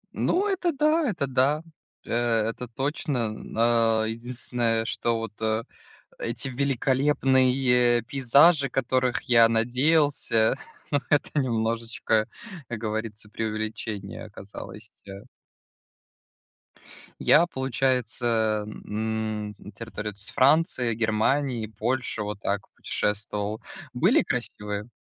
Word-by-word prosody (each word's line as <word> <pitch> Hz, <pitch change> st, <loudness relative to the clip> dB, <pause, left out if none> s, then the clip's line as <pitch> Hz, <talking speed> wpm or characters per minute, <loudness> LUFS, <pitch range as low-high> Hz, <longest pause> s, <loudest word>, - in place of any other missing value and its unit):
Ну, 380 Hz, +3 st, +1 dB
это 370 Hz, -3 st, 0 dB
да, 305 Hz, +1 st, +2 dB
это 170 Hz, -9 st, -1 dB
да, 135 Hz, +4 st, +1 dB, 0.4 s
э -, -, -8 dB, 0.4 s
это 125 Hz, +2 st, -6 dB
точно, 135 Hz, +3 st, -2 dB
м 110 Hz, 0 st, -9 dB
э 115 Hz, -1 st, +3 dB
единственное, 115 Hz, -1 st, -2 dB
что 115 Hz, 0 st, -1 dB
вот 115 Hz, -2 st, -5 dB, 0.8 s
эти, 115 Hz, +4 st, -3 dB
э, -, -, -5 dB
великолепные 130 Hz, -2 st, +3 dB
пейзажи, 140 Hz, +5 st, +4 dB
которых 130 Hz, -1 st, 0 dB
я 115 Hz, -2 st, +6 dB
надеялся 125 Hz, 0 st, +2 dB, 0.4 s
Но 145 Hz, -, +3 dB
это 145 Hz, -, +3 dB
немножечко, 115 Hz, -2 st, 0 dB, 0.4 s
как 115 Hz, -2 st, -5 dB
говорится, 110 Hz, -1 st, -4 dB
преувеличение 110 Hz, -2 st, -4 dB
оказалось, 105 Hz, +1 st, -10 dB, 0.2 s
э 100 Hz, +3 st, -9 dB, 2.0 s
Я, 170 Hz, -, +5 dB
получается, 120 Hz, -6 st, 0 dB
м, 110 Hz, 0 st, -3 dB
на 105 Hz, -, -12 dB
территории 105 Hz, 0 st, -6 dB
вот 100 Hz, -, -10 dB
с 105 Hz, -, -2 dB
Франции, 135 Hz, -3 st, +3 dB
Германии, 115 Hz, +2 st, 0 dB
Польши 115 Hz, +2 st, -2 dB
вот 105 Hz, -1 st, -5 dB
так 100 Hz, 0 st, -2 dB
путешествовал. 105 Hz, 0 st, -2 dB, 0.3 s
Были -, -, +4 dB
красивые. 105 Hz, 0 st, -4 dB
115 Hz, 105 wpm, -26 LUFS, 110-130 Hz, 2.0 s, я